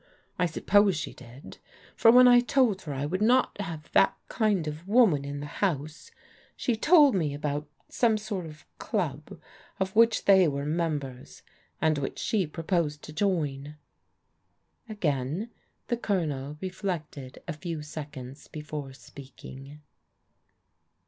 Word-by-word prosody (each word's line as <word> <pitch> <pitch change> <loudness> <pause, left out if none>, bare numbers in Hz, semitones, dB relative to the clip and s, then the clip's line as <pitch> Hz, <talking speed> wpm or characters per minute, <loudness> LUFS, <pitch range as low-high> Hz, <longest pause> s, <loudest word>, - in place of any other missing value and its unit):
I 180 - +3
suppose 195 +3 +3
she - - -5
did, 125 +2 -13 0.4
for 225 - +5
when 250 +2 +8
I 245 0 +7
told 245 -5 +2
her 150 - -6
I 135 +2 -2
would 185 +6 -2
not 240 -1 +2
have 165 -5 -7
that 195 - +4
kind 205 -8 +1
of 155 +4 -6
woman 205 - +4
in 140 0 -5
the - - -5 0.2
house, 155 -5 -2 0.5
she 240 - -1
told 295 +3 +5
me 155 -7 0
about 145 0 -3 0.2
some 225 -3 +2
sort 205 -5 -5
of 155 -1 -13
club 155 - -3 0.4
of 190 +1 -2
which 230 +1 +4
they 190 -3 +6
were 140 -1 -2
members, 150 -5 -3 0.4
and 155 -2 +2
which 135 - -4
she 200 -6 0
proposed 160 -2 -2
to 155 - -9
join." 150 -6 -1 1.1
Again 165 - -2 0.3
the 240 - -1
Colonel 150 - -2
reflected 170 -8 -5
a 170 - -3
few 155 0 -6
seconds 145 -3 -9
before 150 -3 -7
speaking. 140 +1 -12
160 Hz, 135 wpm, -27 LUFS, 145-200 Hz, 1.1 s, when